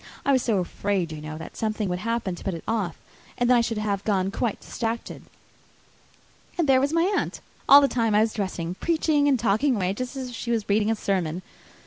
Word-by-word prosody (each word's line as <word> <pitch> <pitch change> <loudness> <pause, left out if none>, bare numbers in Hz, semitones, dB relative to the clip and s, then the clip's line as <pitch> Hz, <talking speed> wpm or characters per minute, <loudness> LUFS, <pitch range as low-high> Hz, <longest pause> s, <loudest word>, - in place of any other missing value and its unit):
I 280 - +3
was 260 -2 +4
so 225 -4 +1
afraid, 185 -1 -1
you 155 -1 -7
know, 155 0 -6
that 160 - -9
something 215 -1 -2
would 180 0 -2
happen 230 -2 -2
to 175 - -9
put 195 - -2
it 165 - -8
off, 210 -7 -1 0.4
and 245 - +1
then 250 - +5
I 240 - +5
should 230 -1 -2
have 205 -2 -1
gone 195 -2 0
quite 225 0 -2
distracted. 230 0 -4 1.4
And 340 -4 +1
there 260 -1 +5
was 280 +2 +1
my 330 +1 +2
aunt, - - -2 0.3
all 285 +1 +10
the 280 - +4
time 230 -5 +1
I 210 - +5
was 220 0 +1
dressing, 180 -4 -3
preaching 310 - +1
and 270 -3 +3
talking 235 +5 +2
away 190 -2 0
just 255 +5 -5
as 260 -2 -5
if 245 - -8
she 235 - -5
was 225 -3 0
reading 210 +1 +2
a 225 - +2
sermon. 185 -4 -2
220 Hz, 225 wpm, -25 LUFS, 190-250 Hz, 1.4 s, all